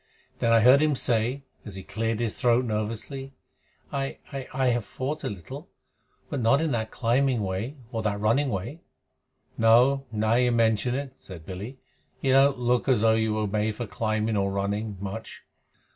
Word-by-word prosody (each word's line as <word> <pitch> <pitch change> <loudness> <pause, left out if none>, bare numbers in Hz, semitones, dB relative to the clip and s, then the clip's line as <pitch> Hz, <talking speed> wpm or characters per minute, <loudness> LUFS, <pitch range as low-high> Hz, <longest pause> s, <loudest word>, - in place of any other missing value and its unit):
Then 115 - +2
I 115 -1 +6
heard 130 +5 +7
him 155 -2 +2
say, 125 +3 0 0.2
as 105 -4 -8
he 95 - -7
cleared 115 +1 -2
his 115 -3 -1
throat, 120 +1 +2
nervously: 115 +5 -4 0.6
"I 135 0 -2 0.2
I 135 -2 -5
I 130 0 0
have 120 -1 0
fought 140 +8 -4
a - - -1
little, 90 -6 -9 0.6
but 140 - -3
not 120 +5 +4
in 160 -1 0
that 110 -2 -1
climbing 125 0 +1
way 100 +9 -3 0.2
or 115 - -2
that 105 -2 -1
running 120 +7 +2
way." 120 - -4 0.8
"No. 125 +5 +4
Now 110 0 +1
you 125 +1 +3
mention 115 +1 +2
it," 135 -1 -4
said 85 -4 -11
Billy, 100 - -7 0.4
"you 135 - +1
don't 135 0 +5
look 125 +2 +1
as 125 -5 +3
though 110 0 +5
you 110 -1 +1
were 110 0 0
made 105 +1 -1
for 120 - -4
climbing 110 +2 -1
or 100 0 +1
running 100 +1 -2
much. 100 +3 -7
115 Hz, 180 wpm, -26 LUFS, 105-130 Hz, 0.8 s, heard